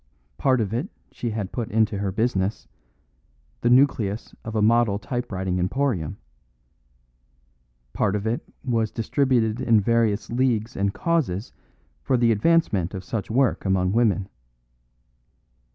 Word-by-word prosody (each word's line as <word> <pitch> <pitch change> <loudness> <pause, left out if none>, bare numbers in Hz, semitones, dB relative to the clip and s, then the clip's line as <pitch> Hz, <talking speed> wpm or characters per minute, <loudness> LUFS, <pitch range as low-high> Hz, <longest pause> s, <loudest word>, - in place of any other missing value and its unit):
Part 130 -3 +3
of 105 -1 -2
it 135 - -2 0.2
she 120 - -4
had 105 -3 -4
put 120 -3 -4
into 110 -1 +1
her 100 -1 -1
business, 105 -2 -1 0.9
the - - +2
nucleus 120 -5 +2
of 110 0 -6
a 110 - +2
model 115 -2 +3
typewriting 95 -6 -3
emporium; 95 - -1 1.8
part 105 -2 +1
of 105 0 -3
it 115 +2 -1 0.2
was 115 -4 +1
distributed 120 -1 0
in 115 -4 +4
various 115 0 +1
leagues 120 -3 0
and 100 0 0
causes 130 - -1 0.5
for 130 - +1
the 120 -1 +3
advancement 105 - +2
of 95 - -6
such 100 0 -4
work 125 +2 +1
among 95 -1 +1
women. 100 -4 +2
110 Hz, 130 wpm, -24 LUFS, 100-120 Hz, 1.8 s, in